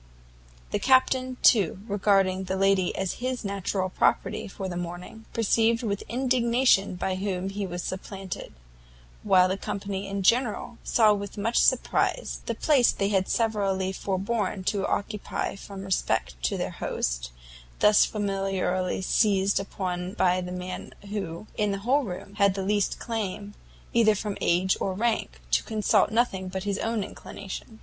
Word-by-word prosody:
The - - 0
Captain, 260 -1 +3
too, 195 -5 +4
regarding 195 -2 +2
the 190 - -2
lady 195 -1 +2
as 190 -2 -2
his 255 -2 -2
natural 195 -1 -1
property - - +1
for 195 -1 -6
the 180 - -5
morning, 175 +5 -7
perceived 230 +1 +2
with 200 -3 -1
indignation 245 -5 +2
by 185 +1 -2
whom 190 0 -2
he 195 0 -3
was 175 -1 -5
supplanted; 190 0 -6 0.7
while 185 -1 +5
the 190 +1 -2
company 200 -1 -4
in 195 0 -3
general, 235 +2 +1
saw 215 -3 +4
with 200 0 -5
much 225 +3 0
surprize, - - +1
the - - -1
place 275 -6 +4
they 200 0 -1
had 190 -2 +1
severally 195 -4 0
foreborne 195 +1 -2
to 200 -1 0
occupy 210 -1 -2
from 195 0 -9
respect 145 - 0
to - - 0
their - - -2
host, - - -3 0.5
thus 210 0 +6
familiarly 195 -3 -1
seized 200 -1 +2
upon 185 -2 -4
by 185 -4 +2
the 180 0 -6
man 180 0 -6 0.2
who, 195 -3 -4
in 210 -1 +1
the 200 - -1
whole 275 +4 +4
room, 190 +1 -7
had 200 -2 +4
the 195 - -2
least 205 0 +1
claim, 205 -3 -4 0.4
either 220 -2 +5
from 210 0 -3
age 185 +2 +2
or 190 - -1
rank, 215 - -1
to - - +4
consult 215 -1 +2
nothing 215 -4 0
but 190 0 -4
his 205 0 -2
own 225 -2 -1
inclination. 200 +3 -8
195 Hz, 155 wpm, -26 LUFS, 185-215 Hz, 0.7 s, thus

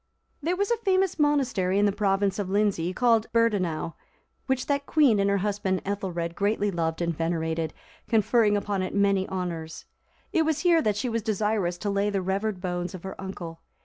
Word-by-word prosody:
There 350 +5 -1
is 405 +3 +1
a 470 - +3
famous 380 -5 +1
monastery 255 -11 +2
in 205 - +4
the 205 - +3
province 195 -1 0
of 195 -2 -2
Lindsey, 195 -4 +1
called 230 +2 +2
Beardaneu,(344) 195 -9 +1 0.5
which 265 -1 0
that 280 0 -1
queen 275 -9 +4
and 200 0 +2
her 200 - +2
husband 195 -1 -1
Ethelred 185 -4 -3
greatly 205 +2 0
loved 165 -1 -1
and 170 -1 -1
venerated, 160 -1 -1 0.4
conferring 220 -1 +3
upon 200 -1 -2
it 185 - -3
many 200 -1 +2
honours. 170 -4 -4 0.5
It 335 - +3
was 315 -1 0
here 345 -3 +4
that 210 -6 0
she 230 - -1
was 230 -1 -1
desirous 210 -4 0
to 205 +3 -2
lay 200 +1 +1
the 195 -2 -1
revered 195 +1 -1
bones 180 0 -3
of 180 - -10
her 190 0 -5
uncle. 170 -4 -7
200 Hz, 185 wpm, -26 LUFS, 180-230 Hz, 0.5 s, in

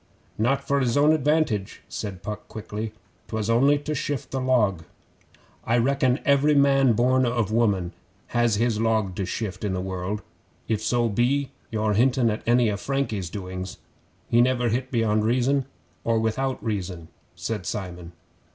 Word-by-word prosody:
'Not 135 +5 0
for 140 0 +2
his 125 -1 +1
own 145 +2 +5
advantage,' 150 -9 0
said 100 -4 -6
Puck 105 -1 -6
quickly. 110 0 -5 0.4
''Twas 110 0 -1
only 135 +5 +4
to 150 +1 -4
shift 145 -1 -3
the 135 - -2
log.' 105 -10 +2 0.8
'I 115 - +2
reckon 130 +1 +2
every 145 +1 +4
man 135 -3 +5
born 130 +3 +3
of 120 -4 0
woman 100 -6 +1 0.4
has 120 -2 +3
his 115 0 +1
log 110 -4 +1
to 95 - -2
shift 100 -4 -4
in 100 -2 -1
the - - -2
world 95 +3 -3 0.4
if 110 -2 0
so 120 +2 +1
be 125 +5 +1 0.2
you're 110 -1 0
hintin' 120 +1 +3
at 105 - -3
any 120 -2 +4
o' 100 - -2
Frankie's 110 -8 -2
doings. 95 -1 -6 0.5
He 120 - +4
never 125 -1 +2
hit 125 +3 -1
beyond 110 -3 +1
reason 130 +4 +2 0.4
or 115 -1 +1
without 130 +4 -1
reason,' 90 -7 -4 0.3
said 105 -5 -4
Simon. 90 -5 -5
115 Hz, 160 wpm, -25 LUFS, 105-130 Hz, 0.8 s, own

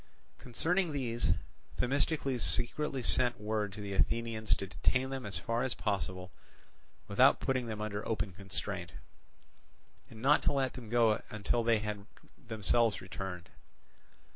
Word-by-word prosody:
Concerning 170 +8 0
these 120 -4 +1 0.4
Themistocles 135 -1 +1
secretly 135 +2 +1
sent 120 0 +3
word 105 -1 -1
to 105 +2 -8
the 100 -1 -4
Athenians 110 +1 +1
to 100 - -5
detain 125 +6 0
them 130 -4 -4
as 100 - -4
far 115 +1 -1
as 130 -1 -1
possible 95 -2 -2 0.8
without 125 +7 +5
putting 130 -3 0
them 110 -2 -4
under 105 0 -3
open 110 -3 -1
constraint, 95 -1 -5 1.2
and 110 - -11
not 140 +5 +4
to - - +2
let 135 -2 0
them 120 -4 -9
go 115 -2 +3
until 110 +2 0
they 115 -1 +4
had 105 -1 -4 0.3
themselves 115 0 +1
returned. 95 -2 -6
115 Hz, 140 wpm, -33 LUFS, 105-125 Hz, 1.2 s, without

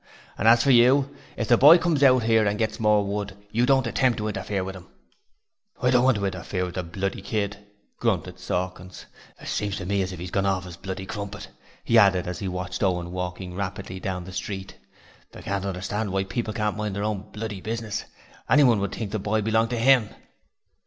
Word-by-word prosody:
And 110 - 0
as 115 +1 +6
for 140 - +4
you, 130 +3 +4 0.2
if 115 - -2
the 120 - +4
boy 150 +5 +9
comes 170 -5 0
out 130 -3 +5
here 115 -1 +4
to 100 0 +1
get 110 0 -2
more 105 -2 +3
wood, 100 -1 -4 0.2
don't 130 +3 +3
you - - -1
attempt 125 0 +2
to 105 - -2
interfere 95 -1 -3
with 95 +1 -6
him.' 90 -1 -12 0.9
'I 125 -2 +2
don't 125 -1 +4
want 130 -3 +4
to 100 - -2
interfere 95 0 -3
with 90 - -7
the 90 - -2
bloody 95 +3 -4
kid,' 105 -2 -2 0.4
grunted - - -1
Sawkins. 90 0 -4 0.3
'It - - -11
seems 100 -1 -2
to 90 - -6
me 100 +1 0
as 95 0 -2
if 95 - -7
he's 85 +1 -7
gorn 100 0 +1
orf 95 -2 0
'is 90 -2 -9
bloody 95 +2 -6
crumpet,' 100 0 -6 0.3
he - - +5
added 95 -2 +4
as 90 -1 -5
he 100 - -4
watched 90 0 -4
Owen 90 -3 0
walking 90 0 -5
rapidly 95 0 -5
down 95 -1 -4
the 95 +1 -10
street. 95 +1 -5 0.6
'I - - -10
can't 100 0 -2
understand 100 +2 -3
why 95 0 0
people 110 +3 -3
can't 105 -1 -1
mind 105 -2 -3
their 100 - -2
own 105 -1 -3
bloody 105 -3 -5
business: 110 0 -4 0.4
anyone 130 -7 +5
would 100 -1 -3
think 110 -4 -5
the 110 - -2
boy 105 +2 0
belonged 110 +1 +2
to 120 - -2
'IM.' 125 -3 +4
100 Hz, 215 wpm, -25 LUFS, 95-115 Hz, 0.9 s, boy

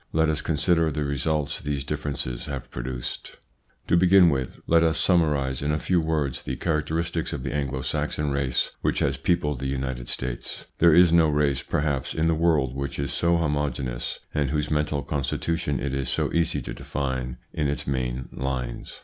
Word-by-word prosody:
Let 80 0 +3
us 75 -1 0
consider 80 +1 +2
the 75 +1 -2
results 70 +1 -1
these 70 -2 -2
differences 70 -4 -3
have 70 -3 -6
produced. - - -5 0.5
To - - +3
begin 90 0 +6
with, 65 -3 -3
let 85 0 +4
us 80 -1 +3
summarise 75 -7 +2
in 75 +1 0
a 75 - +1
few 90 +2 +1
words 75 -5 -1
the - - -4
characteristics 80 +1 -1
of 70 -4 -4
the 65 - -3
Anglo 70 -2 -2
Saxon 70 +3 -1
race 70 -3 0
which - - +1
has 70 - +1
peopled 75 -2 0
the 70 - -2
United 65 -2 -3
States. 65 -1 -4
There 85 -2 +6
is 85 -1 +6
no 85 -2 +5
race, 70 -2 +1
perhaps, 70 -4 -1
in 80 - +1
the 80 - +3
world 80 -6 +2
which 70 0 -3
is 70 -1 -2
so 85 0 +3
homogeneous, 75 -6 -2
and 75 -3 +1
whose 75 0 -1
mental 75 -2 0
constitution 75 +2 -1
it 70 -1 -2
is 70 -2 -1
so - - 0
easy 85 -1 +2
to - - -5
define 65 -3 -3 0.2
in 75 -3 0
its 70 - -2
main 65 -2 -2
lines. 65 -2 -4
75 Hz, 185 wpm, -25 LUFS, 65-80 Hz, 0.5 s, begin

